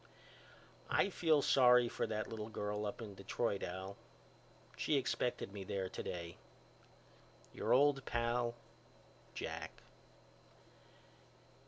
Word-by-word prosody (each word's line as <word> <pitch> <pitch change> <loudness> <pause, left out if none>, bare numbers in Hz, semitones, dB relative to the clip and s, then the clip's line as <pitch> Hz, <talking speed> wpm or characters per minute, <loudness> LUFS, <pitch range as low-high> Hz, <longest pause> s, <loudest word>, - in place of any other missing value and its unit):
I 200 - +3
feel 160 -5 +3
sorry 125 -2 +6
for - - -2
that 110 0 -2
little 110 -1 -5
girl 105 -1 -2
up 105 - -5
in 105 -2 -7
Detroit 100 +1 -1
Al. 95 +2 -5 0.8
She 150 - +1
expected 125 -5 -1
me 100 -2 -5
there 95 0 -2
today. 85 -2 -5 1.2
Your - - -2
old 140 0 +5
pal, 120 -1 0 0.8
JACK. - - -5
115 Hz, 105 wpm, -37 LUFS, 100-125 Hz, 1.2 s, sorry